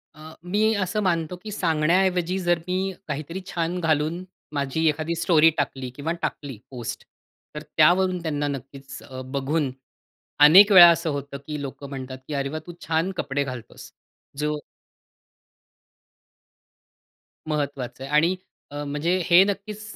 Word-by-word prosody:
अ, 155 Hz, +1 st, -12 dB
मी 210 Hz, +5 st, +1 dB
असं 210 Hz, +4 st, -2 dB
मानतो, 170 Hz, -2 st, 0 dB
की 215 Hz, -, -7 dB
सांगण्याऐवजी 180 Hz, +1 st, +1 dB
जर 175 Hz, -2 st, +1 dB
मी 190 Hz, +1 st, -1 dB
काहीतरी 155 Hz, +5 st, -5 dB
छान 170 Hz, +1 st, -2 dB
घालून 160 Hz, +2 st, 0 dB, 0.3 s
माझी 145 Hz, +3 st, 0 dB
एखादी 155 Hz, +2 st, -2 dB
स्टोरी 165 Hz, -1 st, +4 dB
टाकली 135 Hz, -2 st, -2 dB
किंवा 155 Hz, +3 st, -3 dB
टाकली 135 Hz, -6 st, -4 dB
पोस्ट 120 Hz, -2 st, -6 dB, 0.5 s
तर 150 Hz, -, -5 dB, 0.2 s
त्यावरून 180 Hz, +3 st, +4 dB
त्यांना 145 Hz, -3 st, -2 dB
नक्कीच 135 Hz, 0 st, -7 dB
अ, 130 Hz, 0 st, -8 dB
बघून 140 Hz, +1 st, -1 dB, 0.7 s
अनेक 195 Hz, +8 st, +9 dB
वेळा 175 Hz, -3 st, +11 dB
असं 170 Hz, -1 st, +1 dB
होतं 140 Hz, -1 st, -4 dB
की 150 Hz, -1 st, -4 dB
लोकं 140 Hz, 0 st, -7 dB
म्हणतात, 130 Hz, -1 st, -7 dB
की 150 Hz, -, -5 dB
"अरे 140 Hz, -1 st, -1 dB
वाह! 155 Hz, +2 st, -4 dB
तू 175 Hz, -, -7 dB
छान 165 Hz, +4 st, 0 dB
कपडे 140 Hz, -2 st, -1 dB
घालतोस." 125 Hz, -4 st, -9 dB, 0.5 s
जो 150 Hz, 0 st, -1 dB, 2.9 s
महत्वाचं 140 Hz, -4 st, -3 dB
आहे. 135 Hz, -, -7 dB
आणि 170 Hz, +5 st, +4 dB, 0.4 s
अ, 145 Hz, 0 st, -5 dB
म्हणजे 150 Hz, +5 st, 0 dB
हे 175 Hz, +2 st, +7 dB
नक्कीच 205 Hz, +1 st, -4 dB
155 Hz, 140 wpm, -24 LUFS, 140-175 Hz, 2.9 s, वेळा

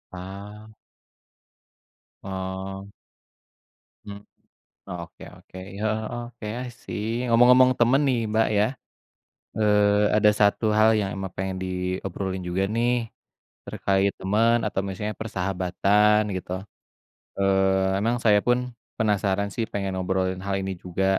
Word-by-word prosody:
Ah. 100 Hz, +4 st, -9 dB, 1.5 s
Oh. 95 Hz, +1 st, -5 dB, 1.2 s
Hmm. 100 Hz, -1 st, -8 dB, 0.7 s
Oke 85 Hz, -2 st, -8 dB
oke, -, -, -15 dB, 0.2 s
heeh, 110 Hz, 0 st, 0 dB
eee, 120 Hz, -, -4 dB
oke, 120 Hz, -3 st, -9 dB, 0.2 s
i -, -, -7 dB
see. 115 Hz, +4 st, -3 dB
Ngomong-ngomong 125 Hz, +2 st, +6 dB
temen 125 Hz, +4 st, +4 dB
nih 130 Hz, -3 st, +2 dB
Mbak 110 Hz, +1 st, +3 dB
ya, 105 Hz, -, +4 dB, 0.9 s
eee, 105 Hz, -1 st, +3 dB
ada 105 Hz, 0 st, +5 dB
satu 105 Hz, +2 st, +3 dB
hal 110 Hz, +1 st, +6 dB
yang 100 Hz, -, -1 dB
emang 95 Hz, -1 st, -5 dB
pengen 95 Hz, 0 st, -2 dB
diobrolin 95 Hz, +1 st, -3 dB
juga 95 Hz, +2 st, 0 dB
nih, 120 Hz, +1 st, +2 dB, 0.7 s
terkait 100 Hz, 0 st, +1 dB
temen 110 Hz, +5 st, +3 dB
atau 100 Hz, -, -2 dB
misalnya 105 Hz, +3 st, -4 dB
persahabatan 100 Hz, +1 st, +2 dB
gitu. 90 Hz, -1 st, -6 dB, 0.9 s
Eee, 95 Hz, 0 st, +2 dB
emang 115 Hz, +4 st, +1 dB
saya 105 Hz, -2 st, +5 dB
pun 120 Hz, 0 st, +4 dB, 0.4 s
penasaran 100 Hz, -2 st, +1 dB
sih 115 Hz, -, -1 dB
pengen 100 Hz, -1 st, -2 dB
ngobrolin 95 Hz, 0 st, -1 dB
hal 100 Hz, -1 st, -1 dB
ini 95 Hz, 0 st, -3 dB
juga. 90 Hz, +1 st, -2 dB
100 Hz, 120 wpm, -25 LUFS, 95-110 Hz, 1.5 s, Ngomong-ngomong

